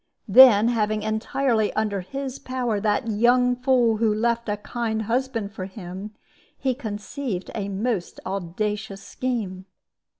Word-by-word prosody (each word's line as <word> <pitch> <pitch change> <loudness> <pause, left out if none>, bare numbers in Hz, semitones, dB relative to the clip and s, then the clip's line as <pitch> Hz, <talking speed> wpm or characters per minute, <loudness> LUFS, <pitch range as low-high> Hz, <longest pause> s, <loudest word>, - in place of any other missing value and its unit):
Then, 225 0 +8
having 215 -2 0
entirely 220 +1 0
under 210 -3 -1
his 270 +6 -5
power 250 -5 -2
that 210 +2 0
young 245 +3 +3
fool 250 -3 +2
who 220 0 +2
left 235 +1 0
a 205 - 0
kind 220 +1 -3
husband 230 -2 -1
for 195 -3 -6
him, 190 +2 -8 0.4
he 260 -1 0
conceived 220 -2 -5
a 200 -2 -3
most 200 -1 -2
audacious 195 +2 -3
scheme. 210 -8 -3
220 Hz, 130 wpm, -24 LUFS, 205-245 Hz, 0.4 s, Then